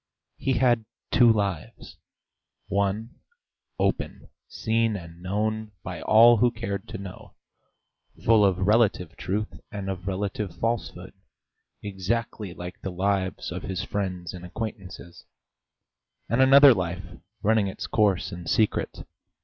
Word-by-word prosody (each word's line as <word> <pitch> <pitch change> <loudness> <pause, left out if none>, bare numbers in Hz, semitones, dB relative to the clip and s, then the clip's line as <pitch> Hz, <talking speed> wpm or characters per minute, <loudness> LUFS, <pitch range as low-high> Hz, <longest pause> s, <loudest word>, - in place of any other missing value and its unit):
He 135 - 0
had 120 -2 +2 0.3
two 120 -2 +6
lives: 100 -6 -3 0.7
one, 100 +3 -1 0.6
open, - - -2 0.2
seen 115 -1 0
and 85 -2 -9
known 105 +3 -2
by - - -6
all 115 +2 +7
who 120 +3 +4
cared 100 -5 -5
to - - -6
know, 95 -1 -10 0.9
full 110 -2 +6
of 95 -1 +2
relative 100 -6 +2
truth 105 +3 -3
and 100 -2 -4
of 95 0 -7
relative 100 0 -3
falsehood, 115 0 -3 0.7
exactly 105 +1 -3
like 90 +1 -8
the 95 - -4
lives 95 0 -1
of 90 0 -4
his 95 0 -3
friends 90 -5 -3
and 90 -1 -9
acquaintances; 90 -3 -7 1.0
and 115 +5 +2
another 135 +1 +8
life 90 -2 -3 0.4
running 110 -1 +3
its 95 - -5
course 100 -3 +1
in 90 -2 -8
secret. 110 -3 0
100 Hz, 125 wpm, -26 LUFS, 95-110 Hz, 1.0 s, another